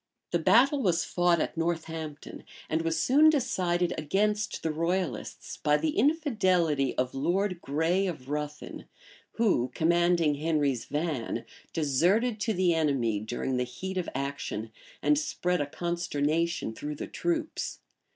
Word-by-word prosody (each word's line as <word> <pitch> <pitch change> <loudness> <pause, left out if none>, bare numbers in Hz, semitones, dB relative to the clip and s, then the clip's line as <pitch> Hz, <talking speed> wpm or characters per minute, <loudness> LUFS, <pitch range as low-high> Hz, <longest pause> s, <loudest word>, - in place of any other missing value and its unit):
The 170 - +2
battle 270 - +4
was 180 -6 +2
fought 175 -1 +2
at - - -2
Northampton; 160 -2 -4 0.3
and 160 +1 +1
was 165 -1 0
soon 285 - +6
decided 180 - +1
against 210 +7 0
the 160 - 0
royalists 165 - -3
by 150 0 +2
the 155 0 -1
infidelity 185 - +2
of 125 0 0
Lord 180 +6 0
Grey 165 +7 +1
of 150 -8 -6
Ruthin, 150 +1 -5 0.5
who, 195 - +2
commanding 170 -1 +3
Henry's 145 -5 0
van, 150 -5 -2 0.3
deserted 180 - +2
to 220 +2 0
the 180 -1 +3
enemy 135 -9 +1
during 120 +4 -2
the 125 - +1
heat 185 +10 -5
of 180 - -3
action, 135 -5 -4 0.3
and 150 0 +4
spread 180 +2 -1
a 145 - -1
consternation 165 -3 -1
through 150 +6 -5
the - - -5
troops. 330 -2 -2
165 Hz, 135 wpm, -28 LUFS, 145-185 Hz, 0.5 s, soon